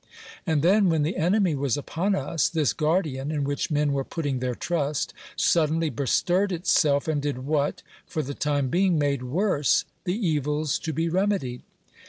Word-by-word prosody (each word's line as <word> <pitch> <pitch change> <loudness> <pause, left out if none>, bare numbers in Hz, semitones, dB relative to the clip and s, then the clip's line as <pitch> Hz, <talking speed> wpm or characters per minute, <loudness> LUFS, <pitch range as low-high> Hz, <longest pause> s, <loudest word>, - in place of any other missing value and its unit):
And 155 -3 +1
then, 195 +2 +4
when 160 -3 +2
the 160 +6 -1
enemy 185 +1 +2
was 140 -2 0
upon 180 +7 -1
us, 150 0 0
this 155 -4 +1
guardian, 150 -4 0
in 150 -2 -1
which 140 +1 -2
men 150 -2 +1
were 135 -1 0
putting 145 -4 -3
their 125 -1 -2
trust, 150 -3 -2 0.2
suddenly 160 -1 +2
bestirred 180 - +1
itself, 155 -5 +2
and 155 -2 0
did 140 -3 -3
what, 145 -1 0 0.2
for 155 - -2
the 140 +1 -5
time 145 -2 0
being, 180 +2 +2
made 140 -3 0
worse 150 +2 +1 0.2
the 180 0 0
evils 150 - 0
to 160 - -3
be 165 +3 -1
remedied. 180 -8 0
150 Hz, 170 wpm, -25 LUFS, 140-170 Hz, 0.2 s, then